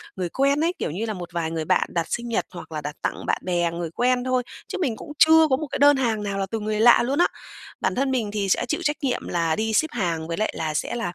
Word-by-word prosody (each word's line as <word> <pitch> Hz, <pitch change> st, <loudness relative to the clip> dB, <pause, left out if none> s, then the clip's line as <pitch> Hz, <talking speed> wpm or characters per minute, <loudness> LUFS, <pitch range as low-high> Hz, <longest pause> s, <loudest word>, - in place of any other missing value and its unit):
người 180 Hz, -2 st, -3 dB
quen 275 Hz, -, +2 dB
ấy, 345 Hz, +2 st, +1 dB
kiểu -, -, -2 dB
như 210 Hz, +7 st, -3 dB
là 220 Hz, -, -3 dB
một 175 Hz, -3 st, -7 dB
vài 165 Hz, -2 st, -2 dB
người 160 Hz, -1 st, -3 dB
bạn -, -, +2 dB
đặt 170 Hz, -1 st, 0 dB
sinh 240 Hz, 0 st, -2 dB
nhật 230 Hz, -, 0 dB
hoặc 165 Hz, -2 st, -9 dB
là 155 Hz, -1 st, -4 dB
đặt 150 Hz, 0 st, -5 dB
tặng -, -, -3 dB
bạn -, -, 0 dB
bè, 175 Hz, -2 st, +1 dB
người 170 Hz, -1 st, -4 dB
quen 245 Hz, +5 st, +1 dB
thôi, 255 Hz, 0 st, +1 dB, 0.2 s
chứ -, -, -4 dB
mình 260 Hz, -10 st, 0 dB
cũng 295 Hz, -, -10 dB
chưa 320 Hz, 0 st, +7 dB
có 260 Hz, -, +4 dB
một 310 Hz, -, -4 dB
cái -, -, -3 dB
đơn 285 Hz, 0 st, +6 dB
hàng 225 Hz, -5 st, 0 dB
nào 200 Hz, -1 st, -3 dB
là 195 Hz, -, 0 dB
từ 225 Hz, -, -1 dB
người 215 Hz, 0 st, -2 dB
lạ 240 Hz, +2 st, +7 dB
luôn 275 Hz, +6 st, -1 dB
á. 350 Hz, -, +5 dB, 0.5 s
Bản 190 Hz, -, 0 dB
thân 270 Hz, +1 st, 0 dB
mình 230 Hz, -6 st, -1 dB
thì 205 Hz, -2 st, -1 dB
sẽ 240 Hz, -, +2 dB
chịu 310 Hz, +7 st, -1 dB
trách 295 Hz, -2 st, 0 dB
nhiệm 255 Hz, -3 st, -1 dB
là 165 Hz, -2 st, 0 dB
đi 220 Hz, +3 st, -1 dB
ship 315 Hz, +8 st, +2 dB
hàng 170 Hz, -8 st, -2 dB
với 165 Hz, -, -3 dB
lại 215 Hz, -, 0 dB
là 155 Hz, -1 st, -2 dB
sẽ 150 Hz, -, -2 dB
là, 230 Hz, -7 st, -2 dB
215 Hz, 295 wpm, -24 LUFS, 175-260 Hz, 0.5 s, chưa